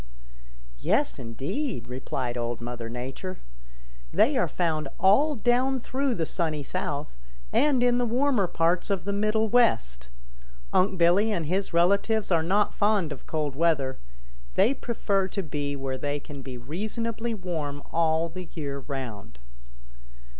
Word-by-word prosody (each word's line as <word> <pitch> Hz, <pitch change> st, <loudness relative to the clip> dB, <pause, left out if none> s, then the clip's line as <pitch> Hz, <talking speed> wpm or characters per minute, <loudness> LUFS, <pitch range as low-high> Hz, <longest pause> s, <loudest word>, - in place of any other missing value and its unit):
"Yes, -, -, +1 dB
indeed," 130 Hz, -, -3 dB
replied 125 Hz, -1 st, -3 dB
Old 120 Hz, -1 st, -2 dB
Mother 120 Hz, -1 st, -5 dB
Nature. 130 Hz, +10 st, -5 dB, 0.7 s
"They 275 Hz, +6 st, +4 dB
are 255 Hz, -, +2 dB
found 155 Hz, -4 st, -1 dB
all 275 Hz, +11 st, +5 dB
down 250 Hz, +3 st, +2 dB
through 265 Hz, +1 st, -1 dB
the 165 Hz, -, 0 dB
Sunny 155 Hz, -3 st, -1 dB
South, 145 Hz, -, -3 dB, 0.4 s
and 275 Hz, -5 st, +4 dB
in 245 Hz, 0 st, +4 dB
the 245 Hz, -, +2 dB
warmer 245 Hz, -4 st, +2 dB
parts 170 Hz, +3 st, +1 dB
of 195 Hz, -3 st, 0 dB
the 200 Hz, -, -1 dB
Middle 215 Hz, +2 st, +2 dB
West. 60 Hz, -, +2 dB, 0.6 s
Unc' 185 Hz, +1 st, +3 dB
Billy 180 Hz, +6 st, +4 dB
and 170 Hz, -6 st, -1 dB
his 190 Hz, +5 st, -1 dB
relatives 200 Hz, +5 st, +2 dB
are 165 Hz, -2 st, +4 dB
not 195 Hz, +6 st, +2 dB
fond 205 Hz, -6 st, +2 dB
of 140 Hz, -, -8 dB
cold 150 Hz, -3 st, -2 dB
weather. 145 Hz, -4 st, +1 dB, 0.6 s
They 245 Hz, -, +4 dB
prefer 205 Hz, -7 st, 0 dB
to 195 Hz, 0 st, -3 dB
be 145 Hz, -2 st, -3 dB
where 135 Hz, -1 st, -3 dB
they 145 Hz, +2 st, -1 dB
can 140 Hz, -1 st, -9 dB
be 130 Hz, -1 st, -7 dB
reasonably 220 Hz, -, -3 dB
warm 155 Hz, -7 st, -4 dB
all 165 Hz, 0 st, +2 dB
the 180 Hz, +1 st, -8 dB
year 140 Hz, -4 st, -3 dB
round. 120 Hz, -, -6 dB
170 Hz, 145 wpm, -27 LUFS, 140-215 Hz, 0.7 s, all